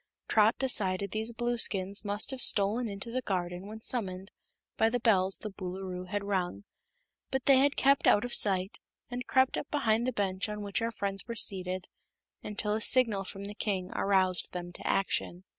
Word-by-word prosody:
Trot 215 +1 +4
decided 200 -7 0
these 220 +2 -2
Blueskins 225 -5 +1
must 205 +3 -2
have 265 -1 -4
stolen 215 +4 +4
into 200 +3 -4
the 255 +2 -1
garden 180 -3 -3
when 220 +1 -9
summoned 195 -5 -2 0.4
by 225 - +3
the 245 +2 -1
bells 195 -5 +2
the 215 - -7
Boolooroo 185 -1 -6
had 205 +1 -2
rung, 180 - -2 0.7
but 265 -1 -2
they 270 -2 +6
had 280 +1 +3
kept 275 0 +3
out 205 - +5
of 245 - -5
sight 190 0 +3 0.3
and 250 +1 -5
crept 260 0 +2
up - - -5
behind 235 -5 +1
the - - +1
bench 200 -2 -1
on 210 0 -5
which 200 +3 -1
our 230 - 0
friends 195 -3 -2
were 235 - -5
seated, 185 -4 -1 0.5
until 210 0 -2
a 220 - -1
signal 225 -5 +3
from 195 +1 -7
the 205 - -6
king 190 -4 -3
aroused 190 -2 +1
them 175 -1 -6
to - - -6
action. 185 -2 -1
205 Hz, 185 wpm, -30 LUFS, 190-230 Hz, 0.7 s, they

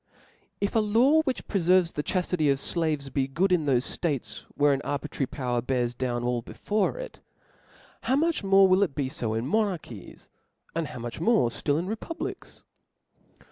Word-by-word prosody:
If 200 - -1
a - - +5
law 235 +9 +4
which 265 - -3
preferves 180 -2 +3
the 150 - -2
chaftity 180 -2 0
of 135 - +1
flaves^ 150 -3 -2
be 135 -2 +1
good 180 +8 0
in 165 -5 +2
thofe 130 -2 0
dates 135 -10 -2
where 145 0 +4
an 135 - -1
arbitrary 145 -1 -3
power 125 -3 -2
bears 125 -2 -1
down 120 -1 -2
all 120 -1 0
before 210 - -1
it, - - -8 0.8
how 260 - +1
much 325 -3 +1
more 195 0 +6
will 185 +1 +4
it 180 -9 +1
be 140 -3 -1
fo 110 -4 -2
in 115 +2 -2
monarchies, 170 - -3 0.5
and 165 -1 -2
how - - -8
njuch 120 +3 -6
more 210 - +3
ftill 145 +5 -1
in 170 - -1
republics 225 - -6
155 Hz, 175 wpm, -27 LUFS, 130-195 Hz, 0.8 s, more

